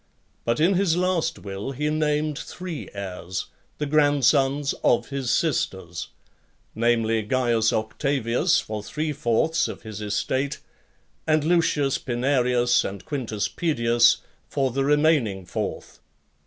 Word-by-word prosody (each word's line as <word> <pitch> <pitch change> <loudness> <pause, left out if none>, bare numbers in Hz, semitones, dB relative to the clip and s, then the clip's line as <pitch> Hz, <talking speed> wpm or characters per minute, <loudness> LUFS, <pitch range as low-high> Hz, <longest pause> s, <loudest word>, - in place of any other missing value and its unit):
But 115 0 +1
in 170 +5 +4
his 180 -3 +2
last 180 -2 0
will, 100 +6 -6
he 150 +3 -2
named 150 -1 0
three 180 -4 -7
heirs, 95 -2 -5 0.3
the 150 - -2
grandsons 145 -1 +3
of 120 - +2
his 135 -3 -3
sisters; 95 - -1 0.7
namely, 115 -1 +1
Caius 115 0 +1
Octavius 135 +7 +1
for 110 -1 -5
three 150 +7 -3
fourths 155 +4 +1
of - - -8
his 110 -2 -7
estate, 130 +6 -1 0.7
and 155 -1 +3
Lucius 155 -4 +2
Pinarius 125 -1 +2
and 95 -1 -6
Quintus 115 -7 -2
Pedius 120 -7 +2 0.3
for 135 -2 0
the 135 +3 0
remaining 145 - +2
fourth. - - -5
135 Hz, 120 wpm, -24 LUFS, 115-150 Hz, 0.7 s, in